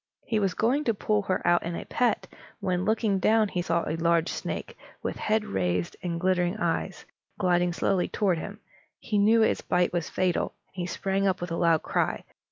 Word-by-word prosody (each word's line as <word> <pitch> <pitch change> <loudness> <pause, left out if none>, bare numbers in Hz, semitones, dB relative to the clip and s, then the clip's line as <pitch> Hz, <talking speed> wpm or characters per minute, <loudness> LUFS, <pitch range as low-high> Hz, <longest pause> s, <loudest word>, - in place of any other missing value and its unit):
He 220 - 0
was 195 -3 0
going 260 +7 +2
to 230 - +1
pull 210 +1 +1
her 190 -2 -2
out 175 - +4
in 170 0 -4
a - - -6
pet, 245 -2 +1 0.3
when, 180 -1 -1
looking 220 -3 +1
down, 215 +2 +3
he 180 - -1
saw 170 -1 0
a 155 - -1
large 170 0 +2
snake, - - -5 0.3
with - - -2
head 215 0 0
raised 90 -2 -1
and 170 -2 -3
glittering 180 +1 +1
eyes, 180 0 -2 0.3
gliding 180 -2 +2
slowly 180 +1 +1
toward 185 -5 0
him. 205 +5 -8 0.4
He 210 -2 -1
knew 220 +2 +5
its - - +1
bite 180 0 +1
was 175 -2 -1
fatal, 185 -2 0
and - - -39
he 180 -2 -3
sprang 195 +2 0
up 185 -1 +1
with 175 0 -5
a - - 0
loud 165 -2 +3
cry. - - -1
185 Hz, 200 wpm, -27 LUFS, 170-210 Hz, 0.4 s, knew